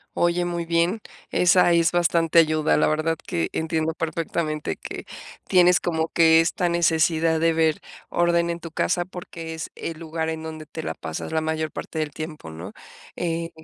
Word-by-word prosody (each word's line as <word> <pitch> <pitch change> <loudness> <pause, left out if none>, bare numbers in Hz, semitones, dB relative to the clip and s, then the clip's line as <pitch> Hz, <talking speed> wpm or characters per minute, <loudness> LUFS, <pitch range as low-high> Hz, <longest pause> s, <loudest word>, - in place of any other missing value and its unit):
Oye, 175 +1 +1
muy 170 -1 -3
bien, 170 +5 +1 0.3
esa 180 0 +4
es 170 -1 +3
bastante 170 -1 +2
ayuda. 155 -1 +4
La - - +3
verdad 155 +1 0
que 85 - -1
entiendo 160 0 -1
perfectamente 160 -1 -2
que - - -8 0.4
tienes 180 -1 +5
como 160 -2 -1
que 165 -1 +5
esta 170 +2 +1
necesidad 165 -1 +2
de 165 0 +3
ver 160 -1 +2 0.3
orden 170 0 +2
en 170 - -5
tu 165 - -8
casa, 175 +2 0
porque 170 -3 -8
es 160 - -6
el 165 - -6
lugar 160 0 -3
en 160 0 -4
donde 155 -1 -7
te 160 +1 -7
la - - -3
pasas 80 - -6
la 160 - +1
mayor 155 0 -2
parte - - -7
del 155 -1 -1
tiempo, 155 - -7
¿no? 85 +6 -8 0.4
Eh, 165 -1 -2
165 Hz, 175 wpm, -24 LUFS, 160-170 Hz, 0.4 s, tienes